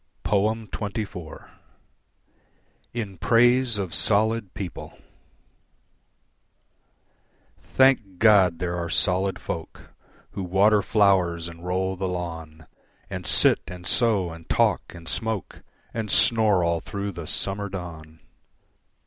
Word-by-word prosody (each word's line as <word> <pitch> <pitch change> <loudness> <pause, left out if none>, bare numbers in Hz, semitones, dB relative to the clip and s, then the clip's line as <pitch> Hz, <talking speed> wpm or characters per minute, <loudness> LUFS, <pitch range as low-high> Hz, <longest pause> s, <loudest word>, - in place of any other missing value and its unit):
XXIV. 105 -4 -3 1.4
In 105 -6 -6
Praise 120 0 +3
of 95 -5 -4
Solid 110 -1 +1
People 95 -4 -7 2.6
Thank 125 -8 +2
God 100 -4 +5
that 85 - -19
there 85 0 -2
are 85 -1 -4
solid 95 +3 +1
folk 80 -1 -8 0.4
Who - - -6
water 100 +3 +3
flowers 95 -5 +2
and 85 0 -11
roll 95 +1 -1
the 95 +1 -3
lawn, 80 -3 -6 0.5
And - - -5
sit - - +5
an 90 0 -9
sew 100 -2 +1
and 80 -1 -13
talk - - +2
and 85 -1 -12
smoke, 110 +1 -3 0.3
And 110 -2 -4
snore 105 -4 +4
all 85 0 0
through 100 +4 -5
the 85 -4 -8
summer 100 +4 -1
dawn. 80 -4 -9
95 Hz, 110 wpm, -24 LUFS, 85-105 Hz, 2.6 s, God